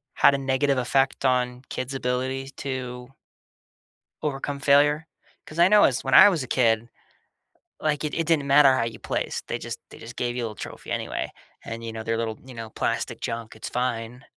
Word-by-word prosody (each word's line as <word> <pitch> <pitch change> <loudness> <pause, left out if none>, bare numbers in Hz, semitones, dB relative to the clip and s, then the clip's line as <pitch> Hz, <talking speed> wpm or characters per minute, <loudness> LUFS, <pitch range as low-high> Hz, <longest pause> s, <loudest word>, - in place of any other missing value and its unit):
had 140 - +5
a - - 0
negative 135 +1 +1
effect 135 +2 +1
on 125 0 +1
kids' 130 +2 -4
ability 130 +1 -2
to 130 -1 -5 1.1
overcome 140 -1 -3
failure? 145 +3 +4 0.4
'Cause 155 +2 -9
I 175 - +7
know 210 +1 +6
as 125 - +2
when 135 - -2
I 205 - +10
was 165 -8 -1
a - - -8
kid, 115 -2 +2 0.9
like, 150 -1 0
it 150 - -2
it 165 - 0
didn't 150 -4 +2
matter 140 -1 +7
how 115 - +1
you 110 -1 -5
placed. - - -3
They - - -2
just - - -6
they - - -12
just 120 +1 -10
gave 120 0 -2
you 120 - -2
a - - 0
little 105 - -8
trophy - - -8
anyway. - - -3 0.3
And, 115 0 -6
you 115 - -5
know, 110 - -5
they're 115 0 -1
little, 110 -1 -3
you 130 - -11
know, 115 -2 -7
plastic - - -2
junk. 115 -1 -4
It's 110 - -6
fine. 125 0 -3
130 Hz, 200 wpm, -25 LUFS, 120-140 Hz, 1.1 s, I